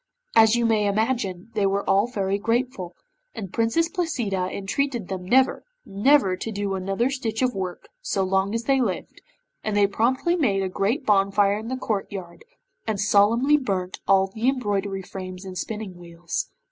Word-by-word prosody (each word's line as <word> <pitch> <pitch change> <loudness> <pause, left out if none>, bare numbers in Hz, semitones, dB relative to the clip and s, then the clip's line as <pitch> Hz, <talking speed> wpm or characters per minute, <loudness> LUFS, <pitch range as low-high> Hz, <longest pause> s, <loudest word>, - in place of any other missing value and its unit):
As 220 0 +6
you 240 0 +1
may 215 -2 +2
imagine, 215 -2 -1
they 200 -2 +2
were 200 +1 -1
all 200 +4 +3
very 200 -4 -1
grateful, 230 -5 -1 0.4
and 195 -3 -7
Princess 230 +9 +2
Placida 240 - -2
entreated 235 +2 -2
them 190 -2 -4
never, 260 +8 +3 0.2
never 205 -1 +3
to 225 +4 -5
do 200 -1 -2
another 195 +7 0
stitch 235 -3 -2
of 250 -1 +1
work 185 -2 -5
so 200 - -1
long 190 +2 +1
as 230 - -1
they 270 +1 +2
lived, 200 -7 -3 0.4
and 215 -1 -1
they 205 - +5
promptly 250 - +1
made 205 - +1
a 190 - -1
great 215 +9 -1
bonfire 200 0 +3
in 220 - -7
the 260 +2 -3
courtyard, 195 -6 -4 0.4
and 215 -2 -1
solemnly 225 +8 +4
burnt 190 -9 -3
all 195 -1 +5
the 220 +6 0
embroidery 200 -6 -1
frames 185 0 -8
and 185 -1 -7
spinning 210 -1 -5
wheels. 175 - -5
205 Hz, 170 wpm, -24 LUFS, 195-240 Hz, 0.4 s, As